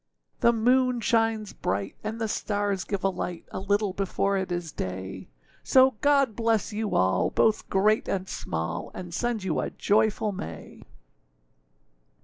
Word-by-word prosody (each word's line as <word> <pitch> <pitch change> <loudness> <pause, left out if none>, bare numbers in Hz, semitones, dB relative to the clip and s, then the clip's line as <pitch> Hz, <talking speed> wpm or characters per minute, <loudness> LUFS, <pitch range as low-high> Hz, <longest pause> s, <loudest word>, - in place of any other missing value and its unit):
The 235 - +5
moon 250 +2 +2
shines 225 -2 +1
bright, 100 0 -2
and 220 +2 -4
the 225 - -1
stars 205 -2 -1
give 200 -2 -3
a 195 - +3
light, 180 -2 -5
A - - -4
little 200 0 0
before 195 +1 0
it 190 -1 -2
is 175 -2 -3
day; 95 -2 -5 0.3
So 260 0 +5
God 275 -6 +3
bless 225 -1 0
you 215 0 -2
all, 95 0 +2
both 220 -1 +1
great 210 +3 +2
and 190 -1 -2
small, 80 - -4
And 175 -2 -7
send 235 0 -1
you 180 -4 -1
a - - -1
joyful 210 0 +1
May! 80 - -8
205 Hz, 150 wpm, -27 LUFS, 180-225 Hz, 0.3 s, The